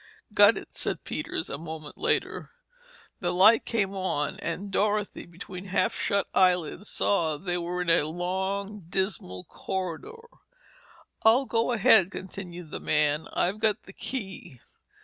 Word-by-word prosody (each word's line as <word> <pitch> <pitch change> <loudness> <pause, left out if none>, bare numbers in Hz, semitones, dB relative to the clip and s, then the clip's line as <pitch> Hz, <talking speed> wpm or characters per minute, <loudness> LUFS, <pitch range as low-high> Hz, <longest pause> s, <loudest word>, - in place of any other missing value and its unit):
"Got - - +7
it," - - -9
said - - -2
Peters, - - -3
a 140 - -5
moment 160 -2 -7
later. 450 - -1 0.7
The - - -1
light 210 +5 +6
came 200 -4 0
on 175 -7 -2
and 195 +4 -4
Dorothy, 210 +1 0
between 180 +2 -9
half 200 +4 +1
shut 200 -2 0
eyelids 180 +1 +2
saw 165 -6 +1
that 175 - -18
they 175 -1 0
were 175 +1 -2
in 175 - -2
a 160 -2 +4
long, 190 +3 -3
dismal 170 - -2
corridor. 190 - -5 1.0
"I'll 235 +5 +5
go 230 0 +1
ahead," 195 -5 +6
continued 180 -4 -8
the - - -4
man, 150 0 +1
"I've 190 +4 0
got 215 -2 +1
the 195 - -13
key." 195 - -6
185 Hz, 145 wpm, -27 LUFS, 170-205 Hz, 1.0 s, Got